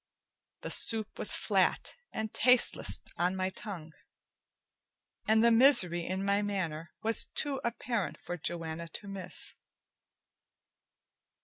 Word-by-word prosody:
The - - -6
soup 220 -2 +4
was - - -1
flat - - 0 0.2
and 220 0 -5
tasteless 250 +1 +2 0.2
on 180 +2 0
my 185 0 -2
tongue, 170 -6 -9 1.3
and 220 +1 +3
the 235 - +5
misery 210 -9 +5
in 190 +2 -3
my 200 +1 +1
manner 170 -6 -4
was 225 +1 +3
too 280 -3 0
apparent 235 -3 -3
for 175 - -6
Joanna 165 0 -5
to 200 +5 -8
miss. 195 -2 -7
195 Hz, 115 wpm, -30 LUFS, 175-225 Hz, 1.3 s, the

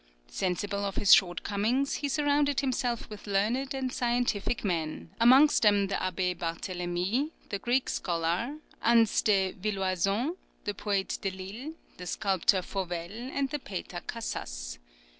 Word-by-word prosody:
Sensible 195 - -2
of 195 -1 -2
his 200 - +6
shortcomings, 205 +9 +2
he 285 - -2
surrounded 285 -1 +2
himself 250 -3 -1
with 210 0 -10
learned 235 +8 0
and 260 -1 -2
scientific 240 -3 0
men, 165 -3 -2
amongst 260 +6 +6
them 205 -2 +4
the - - -2
Abbé 185 0 -1
Barthélemy, 180 - -2 0.2
the 200 - -2
Greek 250 +4 +1
scholar, 175 - -1 0.3
Ansse 230 -2 +4
de 195 -4 +3
Villoison, 195 - 0 0.3
the 205 - -2
poet 200 -1 -1
Delille, 195 +10 -5 0.2
the 180 - -8
sculptor 190 0 +2
Fauvel, 175 -3 -4 0.2
and 275 -1 -1
the 295 - -2
painter 185 -6 -6
Cassas. - - -5
200 Hz, 130 wpm, -29 LUFS, 185-245 Hz, 0.3 s, his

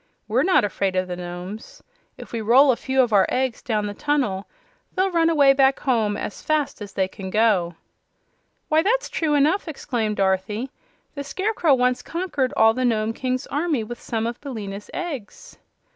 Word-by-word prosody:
"We're - - +2
not 370 - +4
afraid 195 -2 -1
of 185 0 0
the 180 - -4
Nomes. 180 +4 -8 0.3
If - - -11
we 230 - -3
roll 260 +6 +6
a - - +1
few 265 +2 +1
of 235 -3 -2
our 195 -2 +5
eggs 255 -2 -1
down 215 -3 -1
the 205 - -4
tunnel 250 -8 -1 0.5
they'll 380 0 +1
run 330 -1 +3
away 285 -4 +5
back 270 0 +3
home 220 -6 +1
as - - -6
fast 305 -6 -1
as 205 -1 -8
they 190 -1 +1
can 190 0 -8
go." 195 -5 +2 0.9
"Why, 310 +1 +3
that's 470 +8 +1
true 310 -3 0
enough!" 310 +7 +2
exclaimed 235 -8 -2
Dorothy. 200 +6 -1 0.4
"The 280 - -5
Scarecrow 365 -2 +1
once 250 0 +1
conquered 325 -7 -2
all 225 0 +6
the 255 +2 -2
Nome 225 -2 +1
King's 255 +2 -2
army 295 -5 -1
with 240 +2 -8
some 225 -1 -2
of 235 +1 -4
Billina's 210 -7 -7
eggs." 345 - -7
245 Hz, 180 wpm, -23 LUFS, 210-290 Hz, 0.9 s, roll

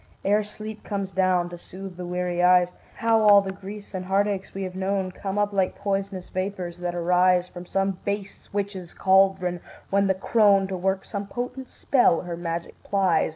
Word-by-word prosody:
Ere 205 +2 +3
sleep 215 +1 -8
comes 195 -2 -3
down 185 -1 +2
to 175 0 -9
soothe 190 +1 -9
the 180 0 -6
weary 180 0 -1
eyes, 180 0 +5 0.2
How 225 -1 +3
all 205 -1 +8
the 195 -1 -3
griefs 200 +2 -9
and 185 -1 -4
heartaches 195 0 0
we 195 - -5
have 185 -1 -5
known 190 0 -1
Come 195 +2 -5
up 205 0 +1
like 190 -2 0
pois'nous 195 -2 -3
vapors 185 -2 -4
that 175 0 -3
arise 180 +1 +3
From 180 0 -10
some 195 -1 0
base 200 -1 -5
witch's 195 -4 -4
caldron, 190 -2 +3 0.3
when 200 0 +3
the 190 - +2
crone, 200 0 +4
To 190 - -2
work 190 +1 -1
some 200 -1 -5
potent 250 +3 -5
spell, 245 -11 +3
her 175 -1 -5
magic 170 0 -5
plies. 190 -5 +2
190 Hz, 185 wpm, -25 LUFS, 180-200 Hz, 0.3 s, all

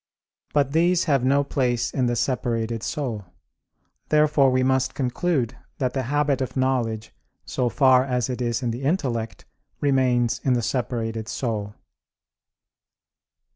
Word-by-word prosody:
But 140 -2 +1
these 170 +3 +3
have 140 -6 +1
no 140 +2 +3
place 125 -4 0
in 130 -2 +1
the 120 - 0
separated 115 -2 -1
soul. 115 -7 -3 0.8
Therefore 150 -3 +4
we 130 0 +2
must 130 0 +1
conclude 130 -1 -1 0.2
that 130 -2 -1
the 135 - -1
habit 145 -2 +1
of 130 - -3
knowledge, 120 -4 -1 0.3
so 125 -2 -1
far 130 -1 +4
as 125 -2 -1
it 125 -1 -4
is 120 +1 -1
in 120 - 0
the 120 +3 -5
intellect, 130 -7 -2 0.3
remains 125 -3 +2
in 130 - +2
the 120 -2 0
separated 115 -3 -2
soul. 110 -5 -3
130 Hz, 135 wpm, -24 LUFS, 120-140 Hz, 0.8 s, Therefore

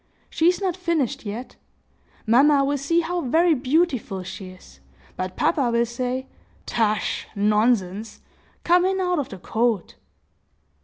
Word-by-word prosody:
She 325 - +2
is 360 - 0
not 375 -4 -1
finished 295 - -1
yet. 230 +5 -7 0.7
Mamma 275 +5 +5
will 285 0 0
see 335 +5 +1
how 350 +1 -2
very 325 +6 +3
beautiful 255 - 0
she 185 +1 -8
is; 185 0 -16 0.4
but 185 0 -4
papa 275 -7 +2
will 235 0 +2
say, 250 +2 -3 0.4
'Tush! 215 -2 -1
nonsense!—come 215 - 0
in 380 +1 +1
out 360 -3 0
of 280 - -3
the 195 - -8
cold! 225 +1 -1
255 Hz, 135 wpm, -23 LUFS, 215-330 Hz, 0.7 s, Mamma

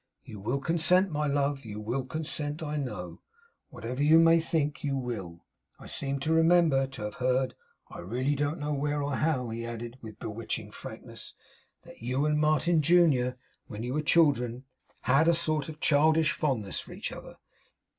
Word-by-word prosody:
You 105 - -10
will 115 +7 -1
consent, 170 +5 +3
my 150 0 0
love; 140 0 0
you 105 -2 -7
will 120 +5 -2
consent, 150 +1 -3
I 150 -1 -3
know. 105 - -5 0.5
Whatever 125 +4 -5
you 155 +2 +6
may 165 0 +6
think; 155 -3 -1
you 140 -2 0
will. 100 -10 -5 0.3
I - - -13
seem 140 -1 -2
to 160 +3 +1
remember 165 -4 +4
to 135 -5 -8
have 105 0 -4
heard 130 +1 +1 0.3
I - - -10
really 125 +10 -1
don't 145 +2 -1
know 150 0 -2
where, 145 +1 -1
or 140 -1 -2
how' 140 -6 0
he 115 +1 -4
added, 120 +1 -6
with 110 -2 -10
bewitching 110 +1 -5
frankness, - - -10 0.5
'that - - -15
you 130 +5 0
and 150 0 +2
Martin 155 +2 +3
junior, 145 -6 +3 0.3
when 110 -2 -6
you 125 +1 -3
were 150 - 0
children, 140 -6 +2 0.4
had 135 +6 +3
a 170 - +5
sort 155 -3 -1
of 155 -1 -9
childish 155 +2 +4
fondness 125 - -1
for - - -10
each - - -5
other. - - -10
140 Hz, 175 wpm, -29 LUFS, 125-155 Hz, 0.5 s, you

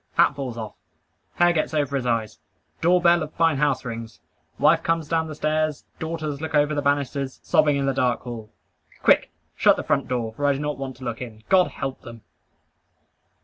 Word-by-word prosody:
Hat - - +4
falls 130 -4 -5
off. 110 -2 -6 0.6
Hair 175 0 +4
gets 155 -1 -1
over 145 -2 0
his 130 -2 -1
eyes. 115 -2 -1 0.4
Door 180 +2 +3
bell 170 0 +5
of 155 0 -5
fine 165 -3 +2
house 140 -3 +1
rings. 115 -2 -7 0.4
Wife - - +4
comes 165 -2 0
down 160 +1 0
the 155 - -7
stairs. 155 -1 -1
Daughters 155 -3 -4
look 160 -1 -3
over 150 +1 +3
the 145 - 0
banisters. 140 -1 -1
Sobbing 150 -2 +3
in 140 - 0
the 135 - +1
dark 125 -2 +1
hall. 115 -3 -8 0.5
Quick - - +4 0.3
shut - - +5
the - - -4
front - - 0
door, 120 -3 -2
for 145 +5 -1
I 140 - +4
do 135 - -4
not 150 -1 -3
want 135 -1 -5
to 130 - -12
look 120 -1 -4
in. 110 -3 -8
God 185 -2 +5
help 135 -1 -5
them! 115 -2 -11
140 Hz, 200 wpm, -24 LUFS, 125-155 Hz, 0.6 s, bell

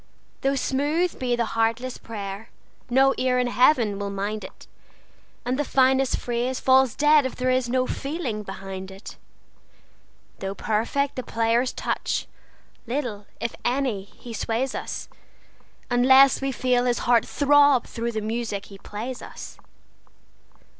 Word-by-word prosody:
Though 275 +1 +1
smooth 295 +7 0
be 245 -2 0
the 235 -1 0
heartless 230 +3 -1
prayer, 205 -1 -7 0.4
no 270 +2 +4
ear 255 0 +2
in 250 - +2
Heaven 245 -4 +3
will 200 0 -3
mind 200 +1 -3
it, 190 - -11 0.8
And 255 +3 -1
the - - +2
finest 265 -1 +3
phrase 245 +2 -2
falls 260 -2 +4
dead 295 0 +5
if 260 - -3
there 255 0 0
is 255 -1 +1
no 255 +1 +1
feeling 275 -6 -3
behind 195 -1 -7
it. 195 +2 -11 1.2
Though 195 0 -4
perfect 235 +8 -1
the - - -1
player's 230 +1 +1
touch, - - -2 0.6
little, 235 -6 -3
if 235 - -3
any, 245 -6 0
he 230 +3 -11
sways 235 +4 -1
us, - - -5 0.8
Unless 265 +3 +6
we 270 0 -1
feel 250 -1 +1
his 245 -1 0
heart 235 -2 +4
throb 285 -1 +4
through 235 0 -4
the 220 - -2
music 220 -2 -3
he 195 -1 -13
plays 235 +6 -6
us. - - -10
245 Hz, 140 wpm, -24 LUFS, 220-265 Hz, 1.2 s, Unless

